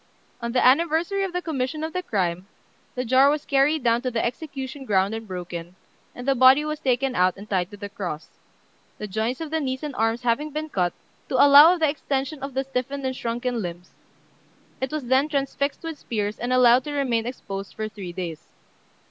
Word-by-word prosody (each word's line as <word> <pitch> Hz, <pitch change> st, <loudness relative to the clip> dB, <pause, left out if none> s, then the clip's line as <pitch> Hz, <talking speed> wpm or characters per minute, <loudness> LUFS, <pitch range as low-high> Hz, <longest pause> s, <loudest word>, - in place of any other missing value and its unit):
On 235 Hz, 0 st, -3 dB
the 250 Hz, -, +2 dB
anniversary 330 Hz, +8 st, +3 dB
of 385 Hz, -, -2 dB
the 360 Hz, 0 st, -3 dB
commission 305 Hz, 0 st, -2 dB
of 320 Hz, 0 st, -4 dB
the 365 Hz, -, -1 dB
crime, 185 Hz, -, -2 dB, 0.5 s
the 250 Hz, 0 st, -2 dB
jar 260 Hz, +4 st, +5 dB
was 295 Hz, 0 st, -1 dB
carried 280 Hz, +1 st, +2 dB
down 235 Hz, 0 st, +3 dB
to 255 Hz, -, -1 dB
the 235 Hz, -2 st, -1 dB
execution 270 Hz, +1 st, -5 dB
ground 200 Hz, -3 st, +1 dB
and 225 Hz, 0 st, -6 dB
broken, 175 Hz, -1 st, -6 dB, 0.4 s
and 245 Hz, +2 st, -8 dB
the 275 Hz, -, +4 dB
body 260 Hz, +3 st, +6 dB
was 305 Hz, 0 st, -3 dB
taken 265 Hz, -2 st, 0 dB
out 185 Hz, -4 st, +2 dB
and 200 Hz, +2 st, -10 dB
tied 185 Hz, -3 st, 0 dB
to 205 Hz, -, -11 dB
the 205 Hz, 0 st, -6 dB
cross, 185 Hz, -7 st, -7 dB, 0.6 s
the 210 Hz, -, -5 dB
joints 220 Hz, -, -2 dB
of 315 Hz, -2 st, -5 dB
the 320 Hz, -, +1 dB
knees 260 Hz, -1 st, -3 dB
and 295 Hz, -2 st, -4 dB
arms 225 Hz, +1 st, 0 dB
having 245 Hz, +6 st, 0 dB
been 305 Hz, +1 st, -4 dB
cut, 180 Hz, -8 st, 0 dB, 0.4 s
to -, -, -1 dB
allow 290 Hz, +5 st, +8 dB
of 345 Hz, -, -9 dB
the 315 Hz, -, +5 dB
extension 280 Hz, 0 st, -3 dB
of 275 Hz, -1 st, -6 dB
the 270 Hz, -, +1 dB
stiffened 270 Hz, +1 st, -3 dB
and 260 Hz, 0 st, -1 dB
shrunken 240 Hz, 0 st, -2 dB
limbs; 175 Hz, -1 st, -7 dB, 0.9 s
it 265 Hz, -, -2 dB
was 305 Hz, -4 st, -3 dB
then 260 Hz, +4 st, +2 dB
transfixed 280 Hz, 0 st, -2 dB
with 325 Hz, -2 st, -6 dB
spears, 210 Hz, -2 st, -3 dB
and 245 Hz, +1 st, -2 dB
allowed 250 Hz, 0 st, +5 dB
to 295 Hz, -, -4 dB
remain 245 Hz, -5 st, 0 dB
exposed 195 Hz, -6 st, -6 dB
for 215 Hz, 0 st, -3 dB
three 200 Hz, -5 st, -8 dB
days. 170 Hz, -3 st, -6 dB
255 Hz, 205 wpm, -24 LUFS, 215-285 Hz, 0.9 s, allow